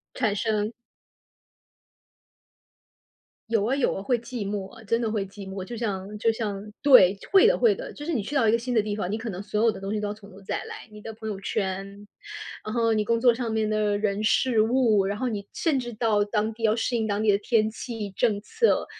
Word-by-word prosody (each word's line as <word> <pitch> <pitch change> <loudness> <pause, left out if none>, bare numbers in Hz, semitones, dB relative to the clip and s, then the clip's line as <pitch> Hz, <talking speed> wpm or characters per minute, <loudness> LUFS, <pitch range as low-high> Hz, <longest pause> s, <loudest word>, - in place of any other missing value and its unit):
产 220 -5 +1
生。 215 0 -1 2.8
有 220 -3 +2
啊， 255 - +1
有 275 -2 +1
啊， - - -4
会 245 +5 +2
寂 235 -3 -5
寞 200 -2 -4
啊， 225 - -13
真 230 +3 +1
的 230 -2 -1
会 210 -3 -1
寂 195 0 -10
寞。 190 -1 -5
就 235 +5 -7
像 205 -3 -3
就 225 +2 +2
像 210 -2 -4
对， 205 -9 +7
会 390 - +7
的， - - +3
会 455 -4 +4
的， - - -7
就 295 - -9
是 340 - -1
你 230 - 0
去 245 +9 -6
到 230 -5 +4
一 - - +4
个 230 - +3
新 245 +2 -4
的 230 - +4
地 210 0 -2
方， 195 -3 -3
你 215 - -1
可 230 +1 -5
能 190 0 -6
所 210 +1 -1
有 230 - +5
的 195 - -9
东 195 +1 -4
西 215 - -1
都 210 - -2
要 205 - -3
从 210 -1 -15
头 195 +1 -14
再 195 - -3
来， - - -9
你 210 - -11
的 225 - -7
朋 220 0 -7
友 205 -2 -4
圈， 195 0 -3 0.6
嗯 215 - -4
哼 230 -1 +2
你 210 - +1
工 230 +1 +1
作 240 -1 +5
上 235 -1 -3
面 220 -1 0
的 210 -1 +1
人、 205 0 -1
事、 225 +1 +3
物， 225 -3 +3
然 200 +1 -2
后 255 - -1
你 205 -4 -4
甚 310 -5 +1
至 240 -1 -6
到 215 -2 +1
当 215 +1 -1
地 225 - -12
要 220 0 +3
适 240 +1 0
应 220 -1 0
当 205 -1 -1
地 215 -1 +4
的 200 - +2
天 215 +1 +2
气、 225 -2 -6
政 210 0 +1
策， 455 - +1
215 Hz, 260 characters per minute, -26 LUFS, 205-230 Hz, 2.8 s, 对